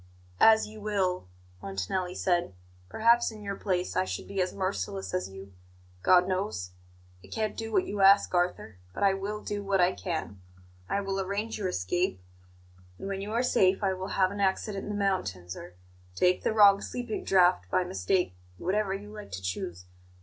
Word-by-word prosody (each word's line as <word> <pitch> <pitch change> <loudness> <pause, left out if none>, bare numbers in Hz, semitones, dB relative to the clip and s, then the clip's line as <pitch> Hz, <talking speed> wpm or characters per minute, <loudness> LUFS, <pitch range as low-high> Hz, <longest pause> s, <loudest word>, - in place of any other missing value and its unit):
"As 220 0 +6
you 215 0 -11
will," 190 - -1 0.3
Montanelli 100 - -3
said. 175 - 0 0.3
"Perhaps 235 +2 +4
in 215 -1 -11
your 200 -1 -3
place 185 -2 -2
I - - +3
should 95 -1 -5
be 195 -1 -1
as 180 - 0
merciless 95 - -3
as 90 +1 -1
you 95 0 -11 0.5
God 180 - +5
knows. 185 - -2 0.5
I - - -13
can't 215 -1 -2
do 225 0 -5
what 195 -3 +2
you 205 0 -3
ask, 195 0 +6
Arthur; 175 - 0 0.2
but - - -2
I 195 -1 +5
will 205 +2 -4
do 205 -1 -3
what 195 -1 +1
I 180 +1 +5
can. 155 - -4 0.5
I 200 - 0
will 195 0 -2
arrange 205 +4 -3
your 195 - -1
escape, 95 - -1 0.8
and - - -7
when 195 0 -3
you 205 +2 -5
are 235 +2 +2
safe 195 -5 +3
I 190 -1 +2
will 185 0 -5
have 190 -1 +3
an 200 0 -4
accident 195 +1 0
in - - -6
the 210 - -2
mountains, 95 - -1
or 90 0 -10 0.4
take 180 - +3
the - - +1
wrong 205 -2 +6
sleeping 245 -3 -4
draught 180 - +3
by 185 - +2
mistake 185 - 0 0.2
whatever 195 +1 0
you 205 +1 -9
like 210 -1 -9
to 95 - -4
choose. 90 -1 -4
190 Hz, 185 wpm, -29 LUFS, 175-205 Hz, 0.8 s, As